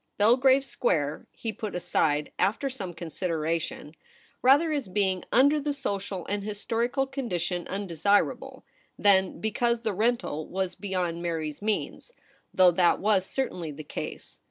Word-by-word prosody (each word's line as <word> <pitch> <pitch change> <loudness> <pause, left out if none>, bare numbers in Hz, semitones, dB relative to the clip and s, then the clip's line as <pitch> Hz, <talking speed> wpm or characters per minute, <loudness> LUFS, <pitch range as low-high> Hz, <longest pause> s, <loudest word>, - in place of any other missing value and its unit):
Belgrave 260 +5 +5
Square 150 - -1
he 225 -2 -5
put 215 -3 -5
aside, 150 -4 0
afier 225 +8 +1
some 195 -8 -5
consideration, 165 -2 -3 0.5
rather 290 +6 +5
as 285 -6 -1
being 190 -1 0
under 285 +4 +5
the 290 0 -2
social 200 -8 -3
and 205 0 -2
historical 230 +5 -1
condition 185 - -3
un 200 +2 -3
desirable, 200 +4 0 0.3
than 190 -2 +3
because 235 +2 0
the 220 -3 -1
rental 215 -7 0
was 190 -1 -2
beyond 180 -4 -3
Mary's 160 -3 -3
means, 215 - -2 0.4
though 185 -1 +6
that 175 0 +3
was 200 -2 +2
certainly 180 -11 -3
the 150 +2 -8
case. - - -7
200 Hz, 135 wpm, -27 LUFS, 175-235 Hz, 0.5 s, though